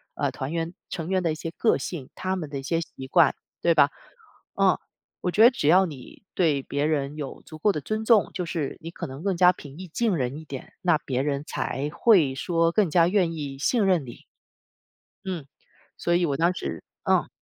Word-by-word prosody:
呃， -, -, 0 dB
团 135 Hz, +3 st, -5 dB
员 165 Hz, +1 st, -2 dB, 0.2 s
成 165 Hz, +1 st, -4 dB
员 185 Hz, -1 st, +1 dB
的 165 Hz, -, +1 dB
一 -, -, -2 dB
些 165 Hz, +1 st, -5 dB
个 220 Hz, -, +2 dB
性， 150 Hz, -8 st, -6 dB
他 185 Hz, 0 st, -2 dB
们 160 Hz, -6 st, -5 dB
的 140 Hz, -2 st, -4 dB
一 -, -, -8 dB
些 165 Hz, +4 st, 0 dB
习 130 Hz, -4 st, -9 dB
惯， -, -, +4 dB, 0.3 s
对 -, -, +4 dB
吧？ -, -, +6 dB, 0.7 s
嗯。 -, -, +4 dB, 0.5 s
我 180 Hz, -, +1 dB
觉 215 Hz, +5 st, +4 dB
得 240 Hz, -, +9 dB
只 150 Hz, -, -2 dB
要 185 Hz, +4 st, +6 dB
你 145 Hz, +3 st, -10 dB
对 150 Hz, -7 st, +2 dB
别 145 Hz, +1 st, -2 dB
人 145 Hz, -2 st, 0 dB
有 145 Hz, -3 st, -7 dB
足 155 Hz, -1 st, -11 dB
够 205 Hz, -, +3 dB
的 150 Hz, -, -3 dB
尊 215 Hz, +8 st, -3 dB
重， 220 Hz, -4 st, +4 dB
就 180 Hz, -, -2 dB
是 160 Hz, -6 st, -3 dB
你 165 Hz, -, -6 dB
可 -, -, -6 dB
能 135 Hz, +2 st, -8 dB
更 195 Hz, -3 st, 0 dB
加 180 Hz, 0 st, +6 dB
平 145 Hz, -1 st, -12 dB
易 185 Hz, 0 st, -8 dB
近 210 Hz, +3 st, 0 dB
人 130 Hz, +2 st, -2 dB
一 160 Hz, -, -11 dB
点， 135 Hz, -3 st, -8 dB
那 175 Hz, -4 st, +3 dB
别 130 Hz, -4 st, -2 dB
人 140 Hz, 0 st, -1 dB
才 145 Hz, +3 st, -3 dB
会 175 Hz, -, +4 dB
说 165 Hz, +3 st, +1 dB
更 200 Hz, -3 st, +2 dB
加 170 Hz, +1 st, +4 dB
愿 180 Hz, -3 st, +2 dB
意 140 Hz, -3 st, -6 dB
信 220 Hz, -, +2 dB
任 180 Hz, -5 st, +3 dB
你。 120 Hz, -3 st, -11 dB, 1.0 s
嗯， 175 Hz, -7 st, -4 dB, 0.5 s
所 170 Hz, 0 st, +1 dB
以 175 Hz, 0 st, +3 dB
我 140 Hz, -3 st, -1 dB
当 170 Hz, +2 st, +3 dB
时 80 Hz, -, -5 dB, 0.2 s
嗯。 -, -, +2 dB
165 Hz, 235 characters per minute, -25 LUFS, 140-185 Hz, 1.0 s, 得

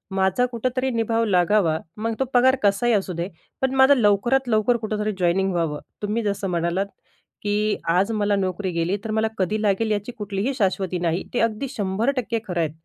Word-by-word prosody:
माझा 190 Hz, +6 st, +2 dB
कुठेतरी 255 Hz, +2 st, -2 dB
निभाव 230 Hz, 0 st, 0 dB
लागावा, 180 Hz, -3 st, +3 dB, 0.2 s
मग 225 Hz, +2 st, -2 dB
तो 265 Hz, -, +2 dB
पगार 260 Hz, +2 st, +5 dB
कसाही 205 Hz, +4 st, +3 dB
असू 195 Hz, -3 st, 0 dB
दे 170 Hz, +1 st, -3 dB, 0.3 s
पण 265 Hz, 0 st, +1 dB
माझं 265 Hz, +2 st, +6 dB
लवकरात 240 Hz, +4 st, +2 dB
लवकर 220 Hz, +2 st, +3 dB
कुठेतरी 215 Hz, -1 st, -2 dB
जॉइनिंग 185 Hz, +2 st, +2 dB
व्हावं. 165 Hz, -4 st, -1 dB, 0.2 s
तुम्ही 215 Hz, +2 st, -1 dB
जसं 200 Hz, -1 st, -1 dB
म्हणालात 170 Hz, +3 st, 0 dB, 0.6 s
की 210 Hz, +1 st, 0 dB
आज 185 Hz, +6 st, +2 dB
मला 205 Hz, -1 st, +1 dB
नोकरी 190 Hz, 0 st, -2 dB
गेली, 170 Hz, +3 st, 0 dB
तर 220 Hz, -, -4 dB
मला 220 Hz, 0 st, +1 dB
कधी 210 Hz, +3 st, 0 dB
लागेल 215 Hz, +1 st, +1 dB
याची 210 Hz, +3 st, -2 dB
कुठलीही 205 Hz, +5 st, -2 dB
शाश्वती 190 Hz, -5 st, 0 dB
नाही. 170 Hz, +1 st, 0 dB
ते 245 Hz, -, 0 dB
अगदी 230 Hz, +4 st, 0 dB
100% 230 Hz, +2 st, -1 dB
खरं 180 Hz, -2 st, -2 dB
आहेत. 160 Hz, -2 st, 0 dB
210 Hz, 175 wpm, -23 LUFS, 190-230 Hz, 0.6 s, माझं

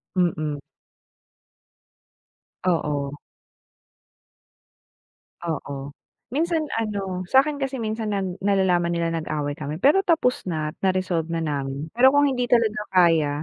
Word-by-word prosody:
Mm. 155 Hz, -5 st, 0 dB, 2.1 s
Oo. 145 Hz, -5 st, 0 dB, 2.3 s
Oo, 140 Hz, -3 st, -4 dB, 0.4 s
minsan 325 Hz, +2 st, +1 dB, 0.2 s
ano, 195 Hz, -4 st, -3 dB
sa'kin 285 Hz, +2 st, +3 dB
kasi, 270 Hz, 0 st, -2 dB
minsan 220 Hz, -1 st, -3 dB
nal 200 Hz, -2 st, -1 dB, 0.2 s
nalalaman 190 Hz, -3 st, +2 dB
nila 170 Hz, -1 st, -1 dB
nag-away 155 Hz, -3 st, -2 dB
kami 150 Hz, +1 st, -5 dB
pero 290 Hz, -, +4 dB
tapos 325 Hz, -9 st, +2 dB
na, 155 Hz, -2 st, -2 dB
at -, -, -31 dB
na-resolve 185 Hz, -4 st, 0 dB
na 165 Hz, -, -1 dB
namin. 140 Hz, +1 st, -4 dB
Pero 255 Hz, +3 st, +6 dB
kung 285 Hz, +1 st, +4 dB
hindi 250 Hz, -3 st, 0 dB
talaga 225 Hz, -3 st, +3 dB
kaya, 165 Hz, -5 st, +4 dB
185 Hz, 110 wpm, -24 LUFS, 155-240 Hz, 2.3 s, Pero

